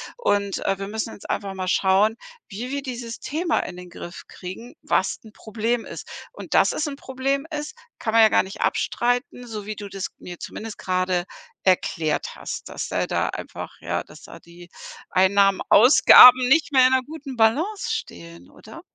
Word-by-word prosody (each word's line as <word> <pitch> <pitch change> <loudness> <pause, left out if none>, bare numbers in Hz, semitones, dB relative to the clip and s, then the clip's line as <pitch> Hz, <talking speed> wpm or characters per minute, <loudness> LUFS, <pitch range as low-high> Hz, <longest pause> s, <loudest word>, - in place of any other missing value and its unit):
Und, 205 - 0
äh, 195 -1 0
wir 195 - -5
müssen 220 +1 -4
jetzt - - -13
einfach 195 -1 -3
mal 185 -1 -5
schauen, 195 +4 +3 0.3
wie 230 +4 -6
wir 280 0 -2
dieses 240 -3 -7
Thema 325 +2 -1
in 180 - -5
den 180 0 -11
Griff 175 +1 -9
kriegen, 190 +7 -9
was 190 - 0
'n 215 - -14
Problem 225 +2 -2
ist.“ - - -9 0.2
Und - - -9
dass - - +4
es 305 - -2
'n 280 - -5
Problem 275 +2 -2
ist, 300 +6 -5 0.3
kann 220 - -2
man 230 - +6
ja 220 - +6
gar - - +3
nicht 190 - -9
abstreiten, 245 +1 -1
so 215 -3 -7
wie 215 - -5
du 205 0 -8
das 195 -1 -5
mir 175 -1 -10
zumindest 225 -1 -8
grade 185 -1 -1 0.4
erklärt 165 -4 0
hast, - - -7
dass - - -5
er - - -1
da - - -1
einfach - - -7
ja, - - -2
dass - - -16
da - - -12
die 175 +1 -16 0.4
Einnahmen, 195 +1 +3
Ausgaben 250 +1 +8
nicht 300 +3 +3
mehr 260 -2 +6
in 260 - +1
'ner 260 - +2
guten 285 -1 -9
Balance 295 - +1
stehen, 85 +1 -8
oder? - - -13
220 Hz, 185 wpm, -23 LUFS, 190-255 Hz, 0.4 s, Ausgaben